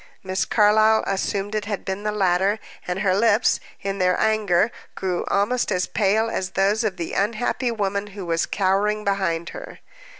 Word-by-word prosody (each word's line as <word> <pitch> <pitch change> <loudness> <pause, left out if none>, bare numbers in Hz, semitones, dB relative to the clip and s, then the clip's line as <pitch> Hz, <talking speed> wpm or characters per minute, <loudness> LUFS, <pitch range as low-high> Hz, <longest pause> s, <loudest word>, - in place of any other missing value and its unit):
Miss 190 0 -1
Carlyle 215 +1 +4
assumed 195 +1 -2
it 215 -1 -2
to - - -8
have 205 - -4
been 190 +1 -3
the 210 0 -1
latter, 195 0 +2 0.3
and 180 +1 -2
her 190 -3 +2
lips, 225 +1 +3 0.2
in 195 0 -3
their 180 -1 +2
anger 215 -1 +2 0.2
grew 185 -2 -2
almost 210 +4 +1
as 180 -2 +1
pale 215 +2 +1
as 190 -4 -3
those 205 +4 +2
of 205 -4 -2
the 170 - -4
unhappy 230 +4 0
woman 200 -2 -2
who 195 - -5
was 165 -1 0
cowering 205 +2 +1
behind 190 -5 -1
her. - - -9
200 Hz, 175 wpm, -23 LUFS, 190-215 Hz, 0.3 s, Carlyle